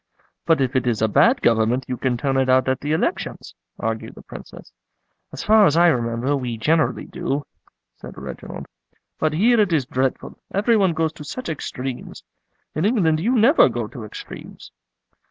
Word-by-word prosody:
"But 165 -4 +3
if 130 0 -1
it 130 -1 +1
is 110 -2 0
a - - +4
bad 235 - +3
Government 115 +3 +2
you 125 - -2
can 125 -1 -1
turn 135 +2 -1
it 130 -1 +1
out 130 0 +4
at 130 0 0
the 145 - -3
elections," 165 - -2 0.3
argued - - -4
the - - -13
Princess. - - -12 0.6
"As - - -6
far 215 -1 +6
as 150 - +1
I 175 0 +6
remember, 120 0 0
we 125 -4 -3
generally 155 +7 +1
do," 140 +1 -3 0.5
said - - -11
Reginald. - - -8 0.5
"But 155 -1 +1
here 225 +8 +3
it 205 -4 +2
is 150 -6 +1
dreadful, 130 +1 -2
every 210 +4 +2
one 190 -5 +3
goes 160 -1 0
to 150 - -10
such 255 - -6
extremes. 130 -4 -6 0.5
In 155 - -2
England 185 -8 +2
you 235 +10 +1
never 235 - +5
go 120 -1 -3
to 120 - -9
extremes." 105 - -10
145 Hz, 180 wpm, -22 LUFS, 125-175 Hz, 0.6 s, far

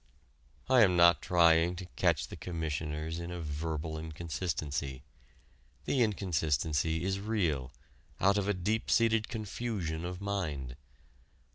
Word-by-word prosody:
I 130 -2 +6
am 90 -5 +5
not 85 0 +6
trying 85 -1 +4
to 90 +1 -7
catch - - +1
the - - -7
Commissioners 80 -1 -3
in 85 0 -5
a 90 0 -5
verbal 80 0 -3
inconsistency. 75 -4 -4 0.8
The 135 - +1
inconsistency 80 - 0
is 95 +1 -1
real, 85 - -1 0.5
out 100 +1 +4
of 100 - -2
a 105 - +2
deep 105 +5 -1
seated 115 -2 +3
confusion 105 -7 -3
of 90 0 -5
mind. 80 -11 -3
85 Hz, 125 wpm, -31 LUFS, 80-100 Hz, 0.8 s, I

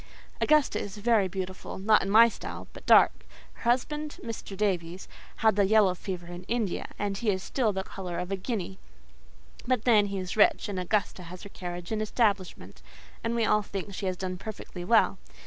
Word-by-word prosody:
Augusta 305 -2 +3
is 205 0 -6
very 215 -2 +3
beautiful—not 190 +3 0
in 195 - -3
my 225 +3 +8
style—but 230 - -8
dark; - - +7 0.4
her - - -18
husband, 300 +5 -1
Mr. 225 -4 -6
Davies, 185 -3 -1 0.3
had 220 -2 +3
the 200 -1 +4
yellow 205 -2 +4
fever 180 -1 -6
in 175 +1 -8
India, 225 -4 -2
and 200 -1 -2
he 230 - 0
is 190 -2 0
still 240 -6 0
the 190 -1 -3
colour 180 -3 -6
of 180 +2 -4
a - - +1
guinea; 190 -2 -4 0.9
but 250 -3 +1
then 215 -4 +5
he 200 0 -4
is 185 -1 -4
rich, 215 - +4
and 200 -3 -3
Augusta 190 +1 -1
has 180 +1 -10
her 200 - -9
carriage 175 -1 -7
and 215 -1 -1
establishment, 205 -4 -1 0.4
and 230 +1 -1
we 230 -1 +2
all 210 0 +3
think 195 0 -6
she 190 +1 -3
has 185 -1 -2
done 185 0 -4
perfectly 195 -3 -7
well. 225 +6 +3
200 Hz, 185 wpm, -28 LUFS, 185-220 Hz, 0.9 s, my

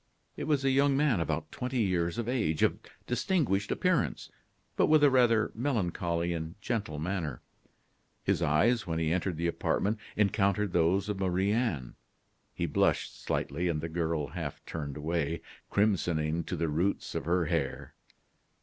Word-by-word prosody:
It - - -4
was 145 -2 +1
a 135 - +4
young 140 +1 +3
man 140 - +3
about 80 - -2
twenty 125 0 -2
years 85 -4 0
of 120 -1 -2
age, 110 -11 0
of - - +2 0.3
distinguished 125 - 0
appearance, - - 0 0.4
but - - +3
with 155 -1 +5
a 145 - +7
rather 120 -4 +4
melancholy 85 -9 -1
and 80 +1 -5
gentle 105 -8 -2
manner. 80 -4 -3 0.8
His - - +1
eyes 105 +10 +2
when 80 -1 -1
he 80 0 +1
entered 90 -1 -1
the 85 - -2
apartment 100 +5 0 0.2
encountered 100 -1 +2
those 90 +4 +2
of 105 -2 -3
Marie 95 +1 +1
Anne; 105 - -1 0.6
he 85 - -1
blushed 75 - 0
slightly, 85 +6 -1
and 80 -3 0
the 80 +2 -4
girl 80 -3 -1
half - - -6
turned 75 -3 -5
away, 80 +1 -1 0.3
crimsoning 85 -6 +1
to - - -3
the 85 0 -1
roots 85 +6 -1
of - - -3
her 85 +1 +2
hair. 75 -5 -2
90 Hz, 160 wpm, -30 LUFS, 80-110 Hz, 0.8 s, a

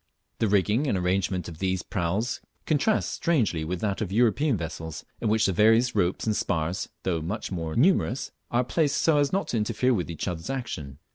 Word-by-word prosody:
The 110 - +2
rigging 105 +7 +2
and 100 - +1
arrangement 90 0 0
of 85 -2 -9
these 95 -1 0
praus 100 +5 -1 0.2
contrasts 155 +8 +2
strangely 115 - +1
with 85 +3 -3
that 100 -1 -1
of 100 -4 -2
European 120 +4 +3
vessels, 80 -1 -6
in 110 - 0
which 110 0 +3
the 95 - +2
various 115 +5 +4
ropes 90 -3 +1
and 110 -1 +1
spars, 85 -1 -1
though 85 -4 0
much 100 +8 -4
more 80 -3 -3
numerous, 140 -3 +2 0.2
are 120 +1 +2
placed 145 +3 +1
so 155 -3 +4
as 145 -1 +2
not 195 +1 -1
to 120 - 0
interfere 115 +4 +1
with 90 -6 -1
each 85 - -4
other's 85 -3 -4
action. 80 - -4
105 Hz, 195 wpm, -26 LUFS, 90-125 Hz, 0.2 s, various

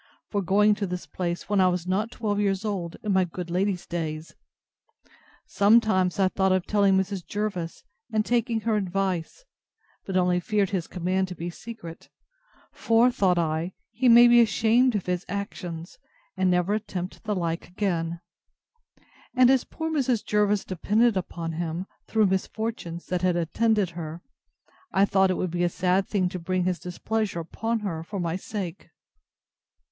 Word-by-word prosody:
for 205 - 0
going 205 +3 +4
to 205 -1 -3
this 180 0 -5
place, 175 -1 -4
when 205 -2 +2
I 185 - +5
was 180 -1 -1
not 195 +4 0
twelve 210 -4 -2
years 200 0 0
old, 180 -5 -3
in 210 -2 0
my 190 0 +4
good 175 0 -6
lady's 185 0 0
days! 160 -2 -4 1.1
Sometimes 200 -3 +3
I 190 - +5
thought 190 0 +1
of 185 -1 +1
telling 200 -2 +3
Mrs. 190 -1 -1
Jervis, 200 -5 -4 0.3
and 215 -1 +1
taking 235 -1 +1
her 220 0 +1
advice, 195 - -2 0.6
and 190 -1 0
only 180 -1 +3
feared 200 +1 0
his 185 -4 -2
command 185 +1 -1
to 180 - -7
be 170 +1 -5
secret; 170 -5 -10 0.6
for, 230 +2 +3
thought 185 -6 +2
I, 165 +2 -1 0.2
he 245 +3 +2
may 240 +1 +9
be 240 0 +7
ashamed 230 +2 +3
of 200 - -1
his 180 0 -1
actions, 180 -4 -6 0.4
and 185 - +2
never 180 +2 +2
attempt 185 -4 -4
the 215 -2 -1
like 170 -2 -2
again: 170 -3 -2 1.1
And 255 0 +6
as 265 -2 +2
poor 320 0 -4
Mrs. 260 -7 0
Jervis 210 -1 +1
depended 210 +5 +2
upon 170 -3 -3
him, 165 +2 -3 0.2
through 220 -1 +3
misfortunes, 190 -2 -3
that 180 -1 -2
had 180 -1 +2
attended 200 +3 +1
her, 165 0 -7 0.7
I 195 +1 +4
thought 190 -1 +3
it 185 - 0
would 185 - -2
be 175 0 0
a 175 - +3
sad 185 +2 +1
thing 190 -3 +1
to 180 - -5
bring 185 +2 -1
his 180 -1 -1
displeasure 195 +1 -2
upon 225 +7 -3
her 170 -6 -3
for 200 +4 -6
my 170 -1 -1
sake. 190 -2 -6
190 Hz, 165 wpm, -26 LUFS, 175-210 Hz, 1.1 s, may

